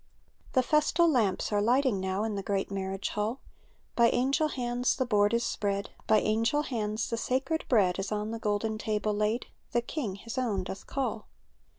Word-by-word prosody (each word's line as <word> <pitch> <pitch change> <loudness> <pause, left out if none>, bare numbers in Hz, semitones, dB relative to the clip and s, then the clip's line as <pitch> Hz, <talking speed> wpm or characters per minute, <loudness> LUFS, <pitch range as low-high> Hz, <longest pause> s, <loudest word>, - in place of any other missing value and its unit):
The 255 - +4
festal 305 +5 +3
lamps 230 - +1
are 205 -1 +2
lighting 245 -2 +2
nozv 190 +3 -1
In 220 - -2
the 200 - -2
great 195 0 -2
marriage 195 0 -3
hall; 215 +5 -2 0.6
By 235 -1 +5
angel 270 +5 +2
hands 245 -3 0
the 260 - 0
board 205 -3 +3
is 235 0 +1
spread. 200 -3 -2 0.2
By 215 - +5
angel 230 +7 +1
hands 220 -4 -2
the 230 - 0
sacred 265 +7 -1
bread 195 -7 +3
Is 195 +2 -3
on 210 +1 -2
the 230 - -4
golden 215 0 -1
table 215 -1 -1
laid; 210 +3 0 0.3
The 240 - +3
King 235 -9 -3
His 230 +5 -5
own 210 -7 0
doth 190 +1 -7
call. 240 -5 -3
220 Hz, 185 wpm, -29 LUFS, 205-250 Hz, 0.6 s, By